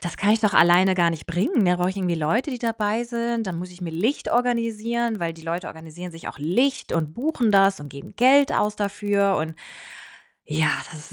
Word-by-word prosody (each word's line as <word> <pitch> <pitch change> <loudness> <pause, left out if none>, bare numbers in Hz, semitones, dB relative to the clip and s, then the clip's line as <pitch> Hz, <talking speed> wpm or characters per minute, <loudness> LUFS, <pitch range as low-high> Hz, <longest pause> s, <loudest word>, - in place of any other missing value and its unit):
das 175 - -6
kann 205 - +1
ich 220 - +4
doch 210 -2 +1
alleine 180 +2 +5
gar 170 -2 +3
nicht 160 -1 -7
bringen. 200 - +1
Da 180 0 +3
brauche 180 +1 0
ich 195 - -8
irgendwie 180 -3 -1
Leute, 165 - 0
die 250 - -5
dabei 225 -1 -1
sind. 235 -2 -3
Dann 170 - -4
muss 180 +1 -7
ich 180 - -16
mir 170 -2 -5
Licht 215 - -1
organisieren, 235 -1 0
weil 165 -1 -2
die 160 - -15
Leute 170 +2 -4
organisieren 165 +2 -9
sich 165 - -9
auch - - -10
Licht 250 - 0
und 155 -2 -2
buchen 255 -4 0
das 195 -3 +4
und 145 - -8
geben 140 +7 -11
Geld 270 +3 +5
aus 210 0 0
dafür“, 200 -1 0
und 160 +1 -4 0.9
ja, 150 0 +1 0.2
das 155 -1 -12
195 Hz, 215 wpm, -23 LUFS, 170-230 Hz, 0.9 s, alleine